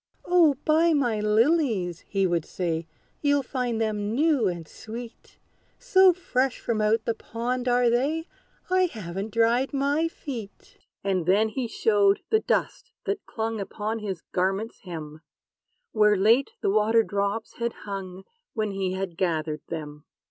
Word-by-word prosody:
"O 340 Hz, -5 st, +5 dB
buy 320 Hz, +2 st, +4 dB
my 245 Hz, -7 st, +1 dB
lilies!" 215 Hz, -, +2 dB
he 195 Hz, -1 st, +1 dB
would 175 Hz, -3 st, +1 dB
say; 165 Hz, -2 st, -3 dB, 0.3 s
"You'll 285 Hz, -1 st, +2 dB
find 250 Hz, -3 st, -2 dB
them 215 Hz, -1 st, -1 dB
new 290 Hz, -6 st, +3 dB
and 170 Hz, -3 st, -4 dB
sweet: 230 Hz, +5 st, -10 dB, 0.4 s
So 380 Hz, -6 st, +5 dB
fresh 270 Hz, -8 st, -1 dB
from 225 Hz, -2 st, -1 dB
out 220 Hz, +1 st, +2 dB
the 230 Hz, -, +1 dB
pond 245 Hz, +3 st, -3 dB
are 245 Hz, 0 st, +3 dB
they, 280 Hz, +8 st, +1 dB, 0.5 s
I 370 Hz, 0 st, +4 dB
haven't 195 Hz, -, -5 dB
dried 230 Hz, +5 st, +2 dB
my 285 Hz, +4 st, +1 dB
feet!" 245 Hz, -10 st, -9 dB, 0.2 s
And 185 Hz, -4 st, 0 dB
then 210 Hz, +4 st, +4 dB
he 245 Hz, +2 st, -3 dB
showed 205 Hz, -3 st, +2 dB
the 440 Hz, -, +5 dB
dust -, -, -1 dB
that 405 Hz, 0 st, -3 dB
clung 225 Hz, -1 st, -3 dB
Upon 215 Hz, +3 st, -3 dB
his 195 Hz, -5 st, -5 dB
garment's 195 Hz, +5 st, -1 dB
hem, 155 Hz, -4 st, -8 dB, 0.7 s
Where 210 Hz, -1 st, +4 dB
late 230 Hz, -, +4 dB
the -, -, +1 dB
water 220 Hz, +2 st, +4 dB
drops 200 Hz, +1 st, -2 dB
had 235 Hz, 0 st, -1 dB
hung, 190 Hz, -2 st, -6 dB, 0.3 s
When 215 Hz, -2 st, -1 dB
he 190 Hz, -1 st, -2 dB
had 190 Hz, -3 st, -4 dB
gathered 155 Hz, -4 st, -1 dB
them. 150 Hz, -2 st, -7 dB
220 Hz, 150 wpm, -26 LUFS, 195-255 Hz, 0.7 s, O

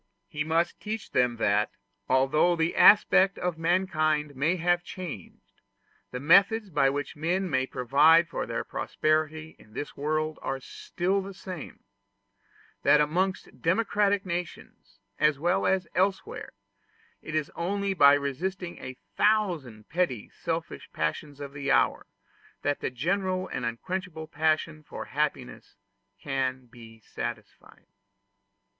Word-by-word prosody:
He 150 Hz, -, -3 dB
must 165 Hz, +2 st, 0 dB
teach 215 Hz, 0 st, -5 dB
them 125 Hz, -1 st, +2 dB
that, 105 Hz, -1 st, +2 dB, 0.4 s
although 135 Hz, +7 st, +3 dB
the 165 Hz, 0 st, 0 dB
aspect 195 Hz, -2 st, +6 dB
of 175 Hz, -2 st, -3 dB
mankind 155 Hz, -4 st, +1 dB
may 155 Hz, +7 st, +1 dB
have 175 Hz, 0 st, +1 dB
changed, 170 Hz, -, -9 dB, 0.5 s
the 125 Hz, -, -5 dB
methods 195 Hz, -, +4 dB
by 135 Hz, -3 st, +3 dB
which 145 Hz, +1 st, -4 dB
men 175 Hz, +5 st, -1 dB
may 130 Hz, -5 st, 0 dB
provide 150 Hz, +7 st, +4 dB
for 165 Hz, -, -4 dB
their -, -, -2 dB
prosperity 155 Hz, +1 st, -1 dB
in 105 Hz, -, -19 dB
this 145 Hz, -, -6 dB
world 155 Hz, +2 st, -2 dB
are 135 Hz, 0 st, -3 dB
still 185 Hz, +8 st, -2 dB
the 195 Hz, 0 st, -8 dB
same; 185 Hz, -5 st, -7 dB
and -, -, -29 dB, 1.0 s
that 150 Hz, -, +5 dB
amongst 180 Hz, +6 st, -1 dB
democratic 200 Hz, +2 st, +1 dB
nations, 170 Hz, -, -6 dB, 0.2 s
as 150 Hz, -1 st, +3 dB
well 175 Hz, +5 st, +1 dB
as 190 Hz, -2 st, +1 dB
elsewhere, 195 Hz, -, -1 dB, 0.7 s
it 160 Hz, -, -6 dB
is 155 Hz, -2 st, -1 dB
only 200 Hz, +3 st, -1 dB
by 145 Hz, -5 st, +7 dB
resisting 175 Hz, +6 st, -3 dB
a 130 Hz, 0 st, -8 dB, 0.2 s
thousand 170 Hz, -, +1 dB
petty 160 Hz, -, -1 dB
selfish -, -, -5 dB
passions 140 Hz, -, -3 dB
of 140 Hz, -1 st, -7 dB
the 140 Hz, -1 st, -4 dB
hour 135 Hz, -, +2 dB, 0.6 s
that 145 Hz, 0 st, 0 dB
the -, -, -2 dB
general 185 Hz, +8 st, -1 dB
and 120 Hz, -, -3 dB
unquenchable 165 Hz, +6 st, -4 dB
passion 155 Hz, 0 st, 0 dB
for 150 Hz, -, -8 dB
happiness 145 Hz, -3 st, -3 dB, 0.4 s
can 130 Hz, +1 st, -2 dB
be 115 Hz, -2 st, -15 dB
satisfied. -, -, -8 dB
155 Hz, 130 wpm, -27 LUFS, 140-185 Hz, 1.0 s, by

